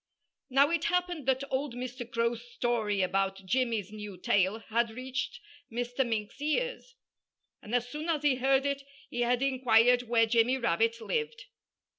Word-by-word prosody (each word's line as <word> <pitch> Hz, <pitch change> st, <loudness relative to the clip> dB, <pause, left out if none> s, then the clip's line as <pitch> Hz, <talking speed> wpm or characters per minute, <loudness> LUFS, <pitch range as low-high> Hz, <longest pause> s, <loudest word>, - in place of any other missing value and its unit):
Now, 275 Hz, +4 st, +4 dB
it 335 Hz, 0 st, 0 dB
happened 355 Hz, -5 st, -1 dB
that 265 Hz, 0 st, +2 dB
old 265 Hz, -1 st, -1 dB
Mr. 245 Hz, -1 st, -6 dB
Crow's 235 Hz, 0 st, 0 dB
story 220 Hz, -6 st, 0 dB
about 195 Hz, +1 st, -1 dB
Jimmy's 225 Hz, -2 st, 0 dB
new 210 Hz, -3 st, -8 dB
tail 190 Hz, +3 st, +2 dB
had 230 Hz, +1 st, 0 dB
reached 260 Hz, -, -4 dB, 0.3 s
Mr. 245 Hz, +3 st, -1 dB
Mink's 225 Hz, +1 st, -3 dB
ears. 485 Hz, +10 st, -2 dB, 0.7 s
And 220 Hz, +3 st, -3 dB
as 245 Hz, 0 st, +1 dB
soon 300 Hz, +6 st, -5 dB
as 305 Hz, -3 st, 0 dB
he 280 Hz, -3 st, +3 dB
heard 270 Hz, +1 st, +2 dB
it 280 Hz, 0 st, -1 dB, 0.3 s
he 240 Hz, -, -2 dB
had 245 Hz, +2 st, +2 dB
inquired 250 Hz, -2 st, +4 dB
where 230 Hz, -1 st, +4 dB
Jimmy 230 Hz, +3 st, +3 dB
Rabbit 230 Hz, 0 st, +1 dB
lived. 465 Hz, -, -2 dB
245 Hz, 155 wpm, -30 LUFS, 225-275 Hz, 0.7 s, Now